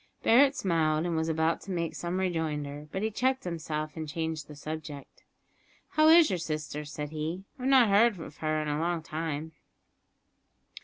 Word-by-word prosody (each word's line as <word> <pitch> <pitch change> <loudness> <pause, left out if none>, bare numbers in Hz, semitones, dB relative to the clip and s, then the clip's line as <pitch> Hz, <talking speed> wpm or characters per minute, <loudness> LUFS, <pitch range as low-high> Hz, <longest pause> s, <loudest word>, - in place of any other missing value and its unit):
Barret 270 +4 +5
smiled, 160 -3 +1
and 170 -1 -1
was 160 0 0
about 160 +1 +1
to - - -12
make 170 -2 -2
some 175 +2 -3
rejoinder, 150 -5 -2
but 190 - -3
he 220 - 0
checked 260 +4 0
himself 155 -3 -4
and 160 -2 -5
changed 160 -1 -3
the 150 - -10
subject. 150 -1 -8 0.7
"How 310 0 +4
is 325 -3 +7
your 180 - -1
sister?" 155 -2 -4
said 150 0 -6
he, 160 +4 -4 0.2
"I - - -9
have 260 - 0
not 255 -5 +6
heard 215 +4 +5
of - - -13
her 160 - -8
for 155 0 -1
a 150 0 -1
long 170 0 -1
time." 160 0 -4
160 Hz, 185 wpm, -29 LUFS, 155-190 Hz, 0.7 s, is